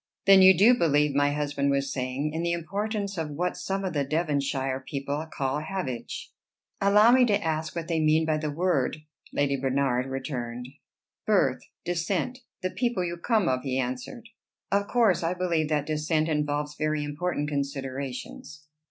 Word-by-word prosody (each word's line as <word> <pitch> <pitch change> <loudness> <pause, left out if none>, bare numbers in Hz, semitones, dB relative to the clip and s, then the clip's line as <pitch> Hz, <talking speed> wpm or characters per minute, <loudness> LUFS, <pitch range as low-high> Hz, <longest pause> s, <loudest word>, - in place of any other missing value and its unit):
"Then 195 -1 +8
you 190 -1 +8
do 220 +7 +7
believe," 150 - +2
my 145 +1 +3
husband 145 -1 -1
was 140 0 0
saying, 135 +3 -2
"in 160 - -2
the 170 0 0
importance 200 +3 -3
of 160 -2 -2
what 175 +5 -2
some 195 0 -3
of 185 - -2
the 145 -2 +1
Devonshire 140 -3 -1
people 140 +3 -4
call 135 0 -1
havage?" 155 -8 -5 0.5
"Allow 210 +3 +6
me 255 0 +6
to 205 -3 +2
ask 160 0 -2
what 165 -1 -4
they 165 -2 0
mean 155 +1 +3
by 155 -1 +1
the 155 0 -2
word," 155 -3 0 0.3
Lady 140 -1 +1
Bernard 135 -1 0
returned. 125 -3 -5 0.6
"Birth, - - +3 0.2
descent, 175 +8 -1 0.2
the 185 - -1
people 235 -7 -1
you 170 0 -3
come 210 +2 +1
of," 130 -3 +1
he 130 -1 -2
answered. 130 - -4 0.4
"Of 200 0 +1
course 230 -7 +3
I 170 +2 -1
believe 170 -4 0
that 150 -2 0
descent 155 +1 0
involves 150 -1 -1
very 155 0 -1
important 145 +1 -2
considerations." 140 +1 -5
155 Hz, 165 wpm, -27 LUFS, 140-180 Hz, 0.6 s, Then